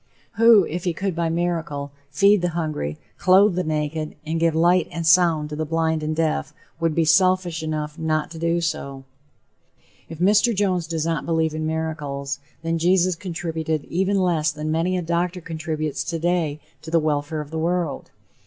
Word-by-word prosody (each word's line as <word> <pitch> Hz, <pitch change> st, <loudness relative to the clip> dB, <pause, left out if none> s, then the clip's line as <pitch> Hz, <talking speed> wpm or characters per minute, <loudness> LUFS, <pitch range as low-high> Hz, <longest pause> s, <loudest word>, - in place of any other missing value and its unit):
Who, 225 Hz, -4 st, +7 dB
if 175 Hz, +2 st, -4 dB
he 175 Hz, -, +1 dB
could 190 Hz, +1 st, -3 dB
by 170 Hz, -1 st, 0 dB
miracle 165 Hz, -4 st, -2 dB, 0.2 s
feed 200 Hz, +6 st, +4 dB
the 175 Hz, -, +1 dB
hungry, 150 Hz, -, -3 dB, 0.2 s
clothe 190 Hz, +2 st, +5 dB
the 180 Hz, +1 st, -1 dB
naked 155 Hz, 0 st, -2 dB
and 160 Hz, +1 st, -2 dB
give 165 Hz, -1 st, +2 dB
light 175 Hz, +1 st, +3 dB
and 165 Hz, +1 st, -4 dB
sound 165 Hz, -3 st, +4 dB
to 150 Hz, -, -5 dB
the 155 Hz, -, -2 dB
blind 160 Hz, 0 st, 0 dB
and 155 Hz, +1 st, -2 dB
deaf, 160 Hz, -1 st, -1 dB, 0.2 s
would 165 Hz, -2 st, 0 dB
be 165 Hz, -, +2 dB
selfish 180 Hz, 0 st, +3 dB
enough 155 Hz, 0 st, -4 dB
not 155 Hz, -1 st, -1 dB
to 165 Hz, -, -8 dB
do 170 Hz, +1 st, +1 dB
so? 140 Hz, -4 st, -3 dB, 1.1 s
If 165 Hz, -, -8 dB
Mr. 210 Hz, +6 st, +3 dB
Jones 185 Hz, -4 st, 0 dB
does 160 Hz, -1 st, -2 dB
not 165 Hz, -1 st, -2 dB
believe 160 Hz, -1 st, +1 dB
in 155 Hz, 0 st, -2 dB
miracles, 145 Hz, -4 st, -3 dB, 0.2 s
then 165 Hz, 0 st, -1 dB
Jesus 180 Hz, +2 st, +3 dB
contributed 165 Hz, -3 st, -3 dB
even 190 Hz, +3 st, 0 dB
less 165 Hz, -4 st, +1 dB
than 155 Hz, +1 st, -4 dB
many 170 Hz, +3 st, 0 dB
a 180 Hz, -, -2 dB
doctor 170 Hz, +2 st, -1 dB
contributes 155 Hz, -2 st, -3 dB
today 165 Hz, -3 st, -1 dB, 0.2 s
to 160 Hz, -, -9 dB
the 165 Hz, 0 st, +3 dB
welfare 155 Hz, 0 st, -1 dB
of 150 Hz, 0 st, -10 dB
the 160 Hz, -, -3 dB
world. 170 Hz, -2 st, -1 dB
165 Hz, 180 wpm, -23 LUFS, 155-175 Hz, 1.1 s, Who